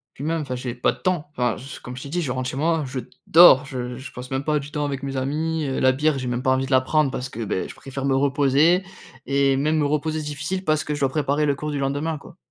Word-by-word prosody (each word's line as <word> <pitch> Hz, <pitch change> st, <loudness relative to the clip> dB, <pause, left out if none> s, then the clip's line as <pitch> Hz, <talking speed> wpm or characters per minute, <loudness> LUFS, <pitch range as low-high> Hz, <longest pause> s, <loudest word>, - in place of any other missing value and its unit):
Puis 140 Hz, -, -8 dB
même, 165 Hz, +1 st, 0 dB
enfin, 130 Hz, -3 st, -4 dB
j'ai 125 Hz, -1 st, -4 dB
pas 120 Hz, -, +1 dB
de -, -, -16 dB
temps, 180 Hz, -5 st, -1 dB
enfin 125 Hz, -5 st, 0 dB
je 135 Hz, +2 st, -9 dB
comme 125 Hz, 0 st, -8 dB
je 130 Hz, -, -7 dB
t'ai -, -, -7 dB
dit, 175 Hz, +5 st, -2 dB
je 140 Hz, -6 st, -2 dB
rentre 130 Hz, 0 st, -2 dB
chez -, -, -6 dB
moi, 160 Hz, +1 st, +1 dB
je 130 Hz, 0 st, -4 dB, 0.3 s
dors, 155 Hz, -5 st, +8 dB
je 125 Hz, -3 st, -5 dB
je 130 Hz, 0 st, -9 dB
passe 125 Hz, +1 st, -9 dB
même 135 Hz, +1 st, -2 dB
pas 150 Hz, -1 st, +2 dB
du 140 Hz, +1 st, -9 dB
temps 150 Hz, -1 st, -1 dB
avec 140 Hz, -1 st, -4 dB
mes 135 Hz, -1 st, -3 dB
amis, 155 Hz, +4 st, -1 dB
heu, 135 Hz, -, -2 dB
la 130 Hz, -, +5 dB
bière, 145 Hz, +2 st, +1 dB
j'ai 130 Hz, -1 st, -4 dB
même 120 Hz, 0 st, -1 dB
pas 130 Hz, 0 st, +2 dB
envie 130 Hz, 0 st, 0 dB
de 135 Hz, -, -8 dB
la 130 Hz, -, +6 dB
prendre 140 Hz, +2 st, +1 dB
parce 125 Hz, 0 st, -4 dB
que 115 Hz, -2 st, -6 dB
beh 100 Hz, -3 st, -2 dB
je -, -, -10 dB
préfère 135 Hz, 0 st, -6 dB
me 135 Hz, -1 st, +2 dB
reposer, 145 Hz, +5 st, +3 dB, 0.4 s
et 140 Hz, -1 st, +2 dB
même 155 Hz, +3 st, +1 dB
me 150 Hz, -, +2 dB
reposer, 150 Hz, +2 st, 0 dB
c'est -, -, -7 dB
difficile, 150 Hz, +6 st, -3 dB
parce 155 Hz, -2 st, +1 dB
que 150 Hz, -, -2 dB
je 145 Hz, -, -6 dB
dois 135 Hz, -, +3 dB
préparer 145 Hz, +1 st, 0 dB
le 145 Hz, -, +2 dB
cours 150 Hz, +2 st, -5 dB
du 145 Hz, -, -2 dB
lendemain, 145 Hz, +4 st, -1 dB
quoi. -, -, -14 dB
140 Hz, 300 wpm, -23 LUFS, 130-150 Hz, 0.4 s, dors